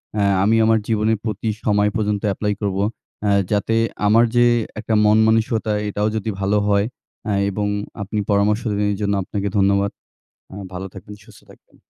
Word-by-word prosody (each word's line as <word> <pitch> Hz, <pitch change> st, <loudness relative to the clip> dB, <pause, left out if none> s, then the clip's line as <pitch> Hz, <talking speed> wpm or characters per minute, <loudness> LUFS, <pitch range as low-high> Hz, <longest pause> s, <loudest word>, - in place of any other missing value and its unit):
অ্যা 105 Hz, -1 st, +1 dB, 0.2 s
আমি 110 Hz, +3 st, +3 dB
আমার 110 Hz, 0 st, +3 dB
জীবনের 110 Hz, 0 st, +1 dB
প্রতি 110 Hz, 0 st, -2 dB, 0.2 s
সময়ে 105 Hz, 0 st, +2 dB
পর্যন্ত 105 Hz, -2 st, 0 dB
অ্যাপ্লাই 105 Hz, +1 st, -1 dB
করব। 100 Hz, -2 st, -1 dB, 0.5 s
অ্যা 105 Hz, -, +2 dB, 0.2 s
যাতে 105 Hz, +2 st, +1 dB, 0.3 s
আমার 115 Hz, +3 st, +5 dB
যে 120 Hz, 0 st, +5 dB, 0.3 s
একটা 110 Hz, +1 st, -2 dB, 0.3 s
মানসিকতা, 110 Hz, 0 st, +1 dB, 0.2 s
এটাও 105 Hz, +1 st, -1 dB
যদি 110 Hz, 0 st, -2 dB
ভালো 100 Hz, +2 st, +1 dB
হয় 100 Hz, 0 st, +2 dB, 0.4 s
অ্যা 105 Hz, -, -1 dB, 0.2 s
এবং 105 Hz, +1 st, -2 dB, 0.3 s
আপনি 105 Hz, +2 st, -3 dB
পরামর্শ 105 Hz, +2 st, +2 dB
দিলেন, 105 Hz, 0 st, 0 dB
এজন্য 100 Hz, 0 st, -1 dB
আপনাকে 100 Hz, +1 st, -3 dB
ধন্যবাদ। 100 Hz, 0 st, +2 dB, 0.6 s
আ -, -, -9 dB, 0.2 s
ভালো 90 Hz, +1 st, -5 dB
থাকবেন, 100 Hz, +2 st, -11 dB
সুস্থ 110 Hz, -2 st, -17 dB
থাকবেন। -, -, -21 dB
105 Hz, 160 wpm, -20 LUFS, 100-110 Hz, 0.6 s, আমার